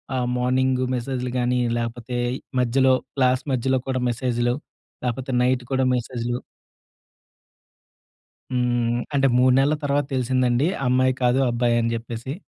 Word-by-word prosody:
ఆహ్, 125 -1 0
మార్నింగు 130 +1 +1
మెసేజ్‌లు 125 0 -3
గానీ, 125 0 +1 0.2
లేపోతే 120 +1 -4 0.4
మధ్యలో 130 +2 +3 0.2
క్లాస్ 130 -1 +2
మధ్యలో 130 +1 +1
కూడా 130 -1 -1
మెసేజ్‌‌లు, 120 0 0 0.5
లేపోతే 125 +2 -3
నైట్ 125 0 +1
కూడా 130 0 +2
మెసేజ్‌లు. 120 0 -3 2.1
హ్మ్. 120 -1 +1
అంటే 135 -1 +3
3 125 0 +5
నెలల 140 +3 +3
తర్వాత 145 0 +1
తెలిసిందండి 130 +1 +1 0.2
అమ్మాయి 130 +1 +3
కాదు 125 +2 +3
అబ్బాయ‌ని 120 -1 +1
జేప్పేసి. 115 +3 -5
125 Hz, 115 wpm, -23 LUFS, 120-130 Hz, 2.1 s, 3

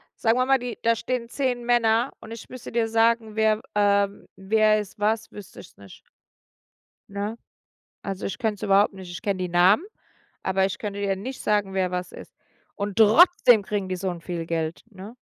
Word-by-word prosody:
sagen 225 +2 +1
wir 255 - +2
mal, 270 0 +4
die 245 -1 -6
da 230 0 +3
stehen 240 0 -4
10 250 -3 -2
Männer 235 0 +2
und 225 - -12
ich 230 - -9
müsste 255 -2 -9
dir 225 -1 0
sagen, 225 -1 +1
wer, 220 0 +2
ähm 200 -1 +1
wer 215 +2 +2
ist 210 0 -8
was, 215 +1 0
wüsste 205 -2 -12
ich - - -13
es - - -29
nicht. 100 -2 -14 1.1
Ne? 205 +3 -4 0.7
Also 195 -1 -5
ich 195 - -5
könnte 220 -4 0
es - - -18
überhaupt 200 +1 +3
nicht. 185 -2 -10
Ich 175 -2 -8
kenne 200 -2 -1
die 180 -1 -2
Namen, 180 - +4 0.6
aber 190 0 +1
ich 195 +1 -5
könnte 205 -1 -5
dir 195 -1 0
nicht 255 +7 -7
sagen, 205 -2 0
wer 185 -1 0
was 180 0 -4
ist. - - -12 0.4
Und 200 -1 -4
trotzdem 230 - +6
kriegen 200 -2 -3
die 185 - -2
so 185 0 -3
'n 170 -1 -7
viel 170 -1 -5
Geld, 165 0 -3
ne? 200 +4 -11
210 Hz, 200 wpm, -24 LUFS, 190-230 Hz, 1.1 s, trotzdem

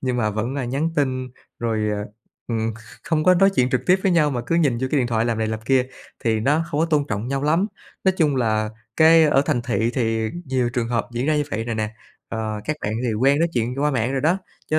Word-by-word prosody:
nhưng 125 -2 -1
mà 110 -3 +1
vẫn, 110 +6 -3
à, 130 - -2
nhắn 140 +7 -1
tin 130 -3 0 0.3
rồi, 110 -2 -1
ờ, 105 0 -3 0.4
ừm, 115 -1 -1
kh - - -13 0.3
không 155 -2 0
có 185 0 +6
nói 195 +2 +5
chuyện 125 0 +2
trực 125 - +1
tiếp 185 +1 +4
với 190 -3 +2
nhau 155 -3 +3
mà 125 -3 -2
cứ 165 - 0
nhìn 140 -8 +2
vô 130 - -1
cái 150 - +2
điện 125 - +1
thoại 115 -1 0
làm 115 -2 -1
này 110 - 0
làm 110 0 -3
kia, 130 +2 +2 0.4
thì 110 -1 +2
nó 150 +7 +2
không 150 - 0
có 165 - +3
tôn 150 -3 +2
trọng 105 +4 -3
nhau 135 0 -1
lắm. 165 +7 +2 0.4
Nói 190 - +4
chung 150 -5 +2
là 110 -3 +1 0.3
cái 160 0 +7
ở 140 -2 +4
thành 125 -7 0
thị 120 -1 0
thì 115 -3 0
nhiều 130 -3 0
trường 120 -1 -2
hợp 115 -2 -1
diễn 120 +3 -2
ra 155 -1 +2
như 150 - +1
vậy 115 -1 -2
rồi 120 -1 -3
nè, 110 -1 -2 0.4
ờ, 110 -1 -3
các 155 - -2
bạn 105 - -2
thì 115 - 0
quen 135 +6 +3
nói 170 +2 +2
chuyện 120 +1 -1
qua 150 - +3
mạng 125 0 0
rồi 135 - 0
đó, 165 +6 +2 0.3
cho 155 - +3
125 Hz, 270 wpm, -22 LUFS, 115-150 Hz, 0.4 s, cái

